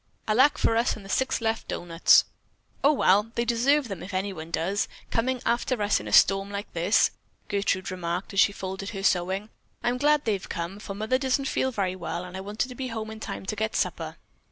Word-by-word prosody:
Alak 260 +7 +4
for 225 - +2
us 235 - +2
and 210 - -11
the - - -11
six 260 +3 0
left 225 0 -1
doughnuts." 170 -1 +4 0.6
"Oh, 285 - +6
well, 210 -6 +3
they 235 - 0
deserve 255 +4 +2
them 195 -6 -6
if 185 +2 -7
anyone 185 -4 -3
does, 170 +5 0 0.2
coming 250 +2 0
after 235 +1 0
us 205 0 +2
in - - -8
a - - -5
storm 195 0 +5
like 200 +1 -6
this," 175 +6 +3 0.4
Gertrude 200 -2 0
remarked 180 +1 -3
as 195 - +1
she 200 - +6
folded 195 0 -5
her 195 -3 -6
sewing. 190 +3 +1 0.3
"I'm 245 +1 0
glad 295 +1 +3
they 220 - +2
have 195 - -5
come, 170 +4 -4
for 200 -2 -7
Mother 220 +5 0
doesn't 270 0 0
feel 265 -1 0
very 190 -5 -1
well 180 -1 -4
and 180 0 -9
I 190 - -4
wanted 210 +5 -3
to - - -7
be 260 +1 -4
home 220 -2 -5
in 220 - -8
time 205 - -6
to 215 - -3
get 220 +1 -2
supper." - - -2
205 Hz, 220 wpm, -26 LUFS, 190-235 Hz, 0.6 s, Oh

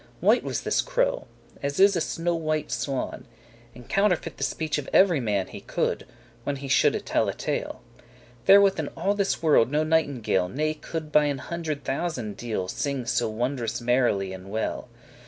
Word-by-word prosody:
White - - +4
was - - -2
this - - +1
crow, - - 0 0.3
as 140 0 -2
is 200 0 +6
a 170 - +1
snow 170 +2 -1
white 155 -2 -2
swan, 135 -2 -3 0.5
And 125 -1 -13
counterfeit 195 -3 +1
the - - -3
speech 155 +2 -1
of 140 - -7
every 180 -6 +5
man 105 -6 0
He - - -10
coulde, - - -2 0.4
when 145 - -2
he 140 0 -7
shoulde 130 - +2
tell - - +1
a - - -4
tale. - - -3 0.6
Therewith 195 -1 +6
in 155 - -2
all 190 +5 +1
this 200 -4 -1
world 145 -7 +5
no 150 +2 +1
nightingale 140 - +1
Ne 155 +7 -1
coulde 155 0 -6
by 150 0 +5
an 145 -2 0
hundred 155 0 -4
thousand 130 - -3
deal* 115 -5 -3
*part 90 - -4
Singe 140 -4 -3
so 115 -2 +1
wondrous 120 0 -2
merrily 120 -6 +1
and 95 +1 -10
well. 110 +2 -3
145 Hz, 180 wpm, -26 LUFS, 120-165 Hz, 0.6 s, is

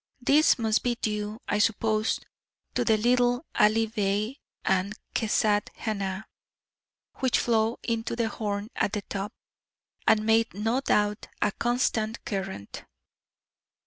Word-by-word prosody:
This 285 +5 +4
must 220 -2 +1
be 245 -1 0
due, 210 -1 -3
I 210 - +1
suppose, 215 0 +1 0.5
to - - +1
the 220 -2 +3
little 245 +4 +2
Ali 215 +2 +4
Bey 215 +3 -1 0.3
and 190 +2 +1 0.2
Kezat 210 -2 +1
Hanah, 200 -2 -3 0.9
which 260 -2 +2
flow 225 0 +1
into 230 0 -2
the 235 -1 0
Horn 205 -1 -3
at 200 - 0
the 210 - -2
top, 200 +2 -4 0.8
and 215 0 +4
made 225 -2 +3
no 225 +6 0
doubt 210 -4 +1
a 210 - +2
constant 235 -1 0
current. 190 - -5
220 Hz, 125 wpm, -27 LUFS, 210-230 Hz, 0.9 s, This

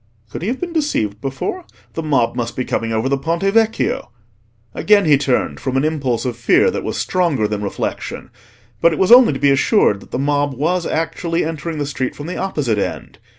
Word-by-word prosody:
Could - - -6
he 180 - -3
have 250 +4 -2
been 350 -1 -4
deceived 110 - -1
before? 135 - -4 0.3
The 165 - -3
mob 135 -7 +1
must 120 -1 -3
be 130 - -2
coming 115 0 -2
over 110 +3 0
the 135 0 0
Ponte 165 +5 -2
Vecchio. 220 +3 +1 0.6
Again 205 -2 +3
he 150 -2 +6
turned, 135 -2 0
from 130 -1 -2
an 135 - +1
impulse 135 -7 -1
of 125 -2 -2
fear 120 0 +3
that - - -4
was - - -3
stronger 165 -12 0
than 105 -1 -3
reflection; 100 - -4 0.5
but 170 - +4
it - - -3
was 190 - +2
only 245 - +8
to - - -3
be 140 +1 +4
assured 135 - +3
that - - -16
the - - -3
mob 145 0 0
was 170 +6 0
actually 165 +1 -1
entering 160 0 -4
the 145 - -2
street 130 -3 -3
from 145 - -8
the 180 - -5
opposite 145 - -1
end. - - -5
145 Hz, 210 wpm, -18 LUFS, 125-175 Hz, 0.6 s, only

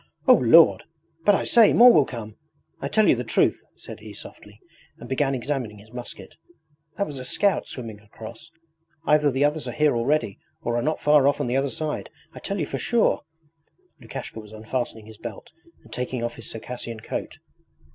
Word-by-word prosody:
'O 255 - +9
Lord! 165 - +6 0.4
But 205 - +6
I - - -1
say, 230 -3 +5
more 245 +1 +8
will 145 -3 +4
come! 110 -4 -8 0.5
I - - -2
tell - - +3
you - - +5
the - - -3
truth,' - - +1
said - - -11
he - - -11
softly, - - -12 0.4
and 120 - -11
began 135 +1 0
examining 125 -4 -3
his 105 +2 -17
musket. 125 -1 -9 0.6
'That 200 - 0
was 145 -6 -7
a - - -6
scout 200 +9 +1
swimming 115 -5 -8
across: 110 +8 -12 0.6
either 150 -1 +4
the 135 +2 +1
others 150 +1 -1
are - - -3
here 150 -3 +2
already 120 -3 0 0.2
or 120 - -1
are 120 - +1
not 155 +5 -1
far 150 -2 +4
off 145 +1 +2
on 145 - -1
the 125 +1 -1
other 135 +1 +1
side 155 +2 -4 0.2
I - - -9
tell 200 0 -3
you 155 - 0
for 135 - -5
sure!' 235 -2 +2 0.8
Lukashka - - -8
was 105 -1 -12
unfastening 110 0 -4
his 110 0 -14
belt 120 +5 -9 0.3
and 115 - -15
taking 125 0 -3
off 120 0 -3
his 115 - -6
Circassian 115 -1 -7
coat. - - -5
130 Hz, 195 wpm, -24 LUFS, 115-150 Hz, 0.8 s, O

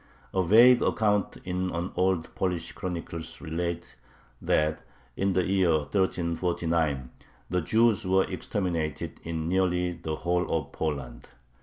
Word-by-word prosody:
A 95 - +2
vague 120 +7 +7
account 105 -3 +1
in 90 0 -2
an 85 +1 -3
old 90 -2 0
Polish 90 -3 -2
chronicle 85 -2 -5 0.2
relates 85 +1 -4 0.4
that 75 0 +1 0.3
in 95 0 +1
the 90 0 +2
year 95 -2 +2
1349 85 -4 0 0.4
the 90 0 +1
Jews 110 +3 +2
were 95 +1 +4
exterminated 85 -7 -3
"in 80 -1 -3
nearly 90 -1 +1
the 80 -2 -4
whole 90 +2 -1
of 75 -4 -1
Poland." 65 -6 -4
90 Hz, 125 wpm, -27 LUFS, 80-95 Hz, 0.4 s, vague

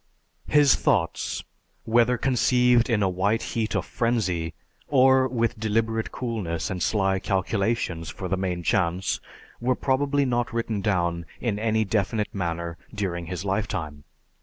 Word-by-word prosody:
His 145 -2 +5
thoughts, 110 - 0 0.4
whether 120 +2 +3
conceived 125 -1 +3
in 110 -3 +2
a - - +3
white 100 +5 0
heat 110 -2 -1
of - - 0
frenzy, 95 -9 -1 0.3
or 130 -1 +5
with 115 -2 -1
deliberate 110 +1 0
coolness 105 -11 -3
and 90 -2 -4
sly 95 0 +1
calculations 95 -3 -1
for 95 - -5
the 95 - 0
main 90 -2 -2
chance, 90 -1 +1 0.4
were 125 +1 +1
probably 140 +2 +1
not 120 -1 0
written 115 -3 -2
down 85 -4 0
in 110 -4 -1
any 110 0 +1
definite 105 +1 -1
manner 85 -3 -3
during 90 -5 -3
his 90 +2 -5
lifetime. 85 -8 -2
105 Hz, 135 wpm, -25 LUFS, 90-120 Hz, 0.4 s, His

